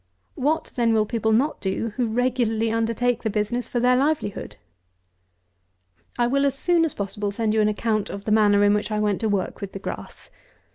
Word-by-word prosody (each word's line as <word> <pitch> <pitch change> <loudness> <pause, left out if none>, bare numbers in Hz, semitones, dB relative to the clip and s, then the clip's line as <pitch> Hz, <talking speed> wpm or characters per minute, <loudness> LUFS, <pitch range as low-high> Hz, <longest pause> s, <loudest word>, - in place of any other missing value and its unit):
What 305 +5 -1
then 235 -2 +2
will 215 -1 +3
people 220 0 -1
not 265 +8 +1
do, 205 +3 -2
who 245 -2 0
regularly 230 -1 0
undertake 230 +1 0
the 220 - -1
business 215 +4 -1
for 240 - -2
their 250 +1 +4
livelihood? 270 - -1 1.6
I 240 - +2
will, 275 +3 +1
as 275 0 -2
soon 345 +2 +2
as 315 - -3
possible, 205 +1 -3
send 215 +1 -1
you 220 - +3
an 210 - +3
account 215 0 -1
of 200 0 -7
the 215 - -1
manner 205 -1 +4
in 205 0 +5
which 210 +1 -1
I 215 -1 -1
went 210 -1 0
to 220 - 0
work 200 -3 -2
with 200 -1 -6
the - - -5
grass. - - -8
225 Hz, 200 wpm, -23 LUFS, 210-245 Hz, 1.6 s, in